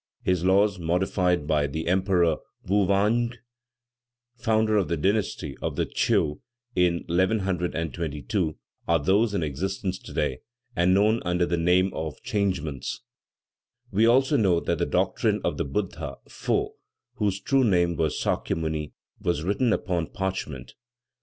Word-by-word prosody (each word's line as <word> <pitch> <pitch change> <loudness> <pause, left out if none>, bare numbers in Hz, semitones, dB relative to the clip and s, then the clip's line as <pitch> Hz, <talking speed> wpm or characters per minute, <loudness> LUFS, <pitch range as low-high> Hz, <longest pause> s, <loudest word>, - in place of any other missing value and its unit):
His 90 -2 +1
laws, 100 +1 +3
modified 90 0 +1
by 75 -1 +2
the 80 +4 -4
Emperor 90 -3 +2 0.3
Vou 100 0 +2
vange, 115 +5 +2 1.0
founder 110 -2 +1
of 100 -4 +2
the 85 - -1
dynasty 95 -5 -1
of - - -2
the - - 0
Tcheou 75 -1 +1 0.4
in 90 -1 +2
1122, 85 -2 -1 0.3
are 85 - +4
those 100 +8 +2
in 85 - 0
existence 95 +6 -3
today, 65 - -2 0.4
and 90 +2 +3
known 105 +3 +3
under 90 0 +1
the 85 - 0
name 90 +3 +2
of 80 -3 -5
"Changements." 90 - -2 0.9
We 110 +3 +4
also 135 +4 +4
know 95 -6 +3
that - - -1
the - - +1
doctrine - - +1
of - - -1
the - - -1
Buddha 95 +8 -3
Fô, - - -1 0.5
whose 100 -2 0
true 135 +4 +2
name 90 -6 +3
was 80 -2 0
Sakya - - 0
Muni 80 -2 -3 0.3
was 85 -3 -1
written 105 +6 +1
upon 90 -6 0
parchment. 90 -10 -4
90 Hz, 140 wpm, -26 LUFS, 80-100 Hz, 1.0 s, are